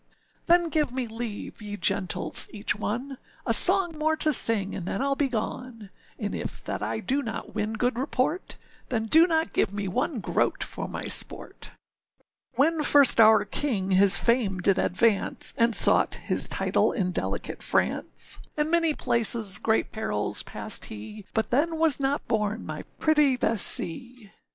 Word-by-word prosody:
â 345 0 +6
âThen 340 -2 -5
give 300 -4 0
me 255 0 -3
leave, 225 -2 -7
ye 205 -1 -7
gentles 195 -2 -1
each 210 -1 -3
one, 245 +6 -5 0.3
A 230 - +1
song 360 +4 +5
more 315 +1 +1
to 310 -1 +1
sing 210 -5 +3
and 180 -2 -6
then 195 - -3
Iâll 275 0 -1
begone, 245 -4 -4 0.3
And - - -5
if - - -6
that - - -5
I 110 +1 -3
do 275 +2 -1
not 230 -3 -7
win 215 0 -3
good 245 +2 -2
report, 280 +6 -3 0.3
Then 225 -3 -2
do 320 +10 +4
not 320 -1 -1
give - - 0
me 205 -1 -5
one 255 - -2
groat - - -1
for - - -7
my - - -7
sport:â - - -7
âWhen 315 +2 +1
first 285 -5 +5
our 220 -1 +5
king 205 -10 -2
his 195 +1 +6
fame 235 -5 0
did 185 +1 +2
advance, 205 +2 +1
And 230 -1 +2
sought - - +5
his - - -1
title - - +1
in 185 -5 -2
delicate - - -4
France, - - +2 0.2
In 300 +1 -1
many 330 -3 +2
places 220 -3 +1
great 220 0 -1
perils 220 - -3
passed - - -4
he; 185 - -10
But 220 - -2
then 320 +6 0
was 320 -4 +3
not 275 +1 -2
born 215 0 -2
my - - -7
pretty 300 -4 +2
Bessee. 230 +1 -2
235 Hz, 165 wpm, -25 LUFS, 205-285 Hz, 0.3 s, â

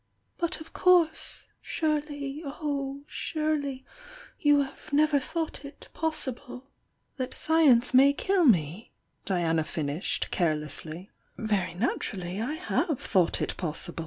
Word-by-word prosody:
But 340 0 -1
of 315 +1 -12
course! 350 -3 +3 0.2
Surely 295 -2 -2
oh 280 -2 -3
suTSv 295 -4 -2 0.6
3,' 290 -1 +5
have 270 - -14
never 295 0 +4
thought 320 +1 -4
it 280 +1 -11
possible 265 -4 -3
" - - -47
' - - -40
^' 255 - +1
^°" - - -12
lesslv 320 +1 +3
4^:1"'^ 240 0 +4
may 270 +2 +7
kill 370 +4 +2
mo?" 175 - +3 0.4
Diana 165 -4 +1
finished, 155 +1 -3
care 170 -4 +2
J^ly. 155 +4 -5 0.3
Very 205 -6 -1
naturally 190 -2 -2
I 275 +7 -2
have 330 -3 -1
thought 185 -5 +1
it - - -2
oo^We! 170 0 -3
275 Hz, 135 wpm, -28 LUFS, 190-310 Hz, 0.6 s, may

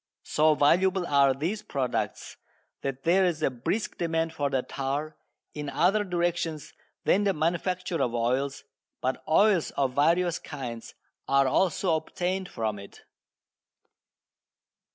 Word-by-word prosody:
So 155 0 +3
valuable 180 +5 +3
are 140 -3 +4
these 175 +10 -2
products 135 -10 -3 0.4
that 135 -1 -4
there 185 +3 +4
is 170 -4 0
a - - +2
brisk 130 - -3
demand 165 -1 0
for 145 -2 -1
the 135 -2 0
tar, 140 +3 -3 0.4
in 150 -1 -5
other 195 +8 +2
directions 175 -4 -2 0.3
than 205 - +3
the 200 -1 +2
manufacture 175 +2 -1
of 120 -1 0
oils, 130 +4 -1 0.4
but 130 +1 -2
oils 185 +2 +4
of 135 -2 +1
various 170 +5 +2
kinds 125 -6 -7 0.3
are 140 0 +4
also 175 +3 +2
obtained 180 +4 -3
from 110 -3 -3
it. 100 - -13
155 Hz, 130 wpm, -27 LUFS, 135-180 Hz, 0.4 s, are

